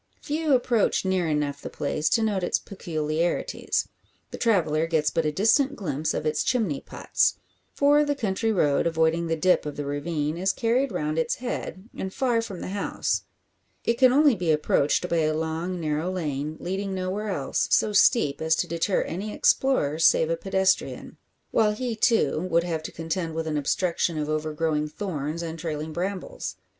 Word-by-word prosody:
Few 305 -1 +1
approach 240 -5 +1
near 185 -2 +1
enough 150 -2 -1
the - - -6
place 150 +1 -1
to 225 - +2
note 205 -3 0
its 175 - +1
peculiarities. 165 -3 -2 0.4
The - - -7
traveller 165 -8 +2
gets 155 -2 +1
but 165 -2 0
a - - +1
distant 245 - +3
glimpse 155 - -2
of - - -3
its 150 -1 +1
chimney 215 - 0
pots; - - 0 0.4
for 290 +1 +4
the 290 -1 0
country 225 -2 -1
road, 150 -7 +2
avoiding 165 +1 +1
the 165 - 0
dip 180 +3 +3
of 150 -1 -5
the 145 - -4
ravine, 150 +2 -2
is 190 +2 +1
carried 245 +3 +1
round 155 -3 -1
its 160 - 0
head, 230 -5 -5
and 190 - -4
far 245 0 +1
from 200 -6 -7
the - - -5
house. 200 +1 -2 0.6
It 235 +1 0
can 255 -1 +6
only 290 +1 +5
be 175 -6 0
approached 150 +2 +2
by 170 - 0
a 155 -1 +1
long, 160 +3 -2
narrow 155 +2 -1
lane, 155 -4 -3
leading 190 +2 -3
nowhere 190 +3 -3
else, 145 -9 -1
so 210 - +3
steep 180 - +4
as 160 0 +3
to 175 - -1
deter 170 +3 0
any 200 +5 -5
explorer 160 - +2
save 165 0 +4
a - - +2
pedestrian; 190 +2 0 0.3
while 215 -2 +3
he, 240 +1 -3
too, 220 - +2
would 170 0 +3
have 165 -3 -2
to 155 - -7
contend 165 0 -3
with 165 0 -2
an 155 -1 -2
obstruction 165 +3 0
of 150 0 -2
overgrowing 155 0 -1
thorns 155 -2 -4
and 165 0 -5
trailing 155 -1 -4
brambles. 185 +3 -4
170 Hz, 180 wpm, -25 LUFS, 155-205 Hz, 0.6 s, can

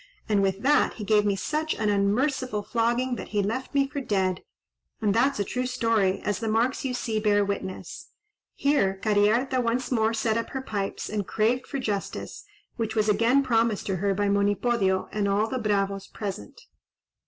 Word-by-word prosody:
—and 210 -3 +2
with 195 +1 0
that 295 +2 +3
he 215 - -6
gave 210 0 +3
me 200 - +2
such 305 +10 -2
an 215 - -1
unmerciful 210 +3 +1
flogging, 240 +3 0
that - - -7
he 205 -1 0
left 255 +7 -3
me 275 -1 +3
for 280 +1 -4
dead; 190 -6 0 0.6
and 210 -3 +1
that's 265 +5 +2
a - - +2
true 250 +5 -2
story, 225 -6 +1
as 205 -2 -1
the 225 - -3
marks 230 +4 +1
you 265 - -1
see 235 -3 -2
bear 205 -1 +3
witness." 195 -2 -5 0.5
Here 275 -10 +2
Cariharta 220 +6 +2
once 245 +2 -1
more 225 -2 +2
set 220 0 0
up 230 - -5
her 265 - -2
pipes 200 -5 -3
and 205 -2 -3
craved 235 +4 0
for - - -4
justice, 210 -6 -4 0.3
which 225 -2 -2
was 215 -1 +2
again 235 +6 +3
promised 230 -4 +1
to 190 -2 -1
her 195 +2 0
by 205 +1 0
Monipodio 200 0 +1
and 210 -1 0
all 200 +2 +2
the 260 +2 -3
bravos 200 -3 -1
present. 195 - -7
220 Hz, 185 wpm, -26 LUFS, 200-245 Hz, 0.6 s, that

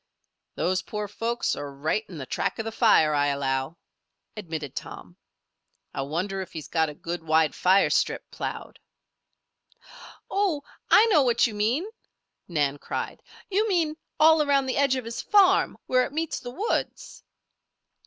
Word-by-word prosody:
"Those 185 +2 0
poor 210 -1 -5
folks 230 +4 -2
are 145 -1 -6
right 155 +10 -1
in 175 - -9
the 135 - -6
track - - -2
of 225 - -4
the 225 - -3
fire, 215 -10 +4
I 145 0 +2
allow," 135 +2 -1 0.6
admitted 160 - -6
Tom. - - -8 0.8
"I - - -3
wonder 180 +8 -3
if 185 - -9
he's 155 -2 -7
got 160 -2 +1
a 150 - -9
good 170 +3 -5
wide 160 -1 +2
fire 190 +2 +3
strip - - 0
ploughed?" - - -6 1.5
"Oh! 385 -8 0 0.3
I 445 - +7
know 385 -10 +4
what 245 -3 +3
you 230 - -2
mean," 225 - 0 0.6
Nan 145 -4 0
cried. - - -5 0.3
"You 425 +3 +1
mean 330 -5 +1 0.2
all 315 0 +6
around 280 -2 +2
the 260 - -2
edge 275 -2 +3
of 255 -3 -4
his 230 0 -5
farm 395 -2 +4
where 255 0 +3
it - - -5
meets 320 +1 -2
the 245 - -8
woods?" 395 - -3
210 Hz, 160 wpm, -26 LUFS, -, 1.5 s, I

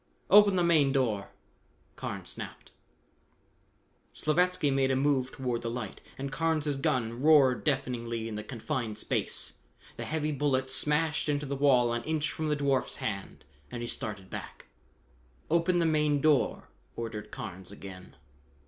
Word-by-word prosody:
"Open 205 -2 +8
the 180 - +3
main 155 -5 +4
door!" 115 -7 0 0.7
Carnes - - -5
snapped. - - -8 1.4
Slavatsky 180 0 +2
made 135 -1 +2
a 135 - +2
move 135 -1 +1
toward 125 -3 -2
the 115 - -3
light, 115 -4 -5 0.2
and 135 0 -4
Carnes' 155 -2 0
gun 120 -3 -1
roared 140 -4 +5
deafeningly 115 -2 -1
in 115 - -5
the 105 0 -4
confined 115 -2 -3
space. - - -2 0.4
The - - -4
heavy 155 -1 -1
bullet 135 -2 0
smashed 150 +2 +1
into 145 0 0
the 140 0 -3
wall 130 -4 +4
an 120 - -1
inch 155 0 0
from 155 -1 -2
the 150 - +2
dwarf's 140 -2 +1
hand 100 -7 -5 0.2
and 120 +6 -5
he - - -3
started 105 -5 -5
back. - - -7 0.9
"Open 170 +2 +3
the 170 - +3
main 150 -2 +2
door!" 150 -1 +2 0.3
ordered 115 -2 -5
Carnes 95 +1 -7
again. 95 -2 -10
135 Hz, 150 wpm, -30 LUFS, 115-150 Hz, 1.4 s, Open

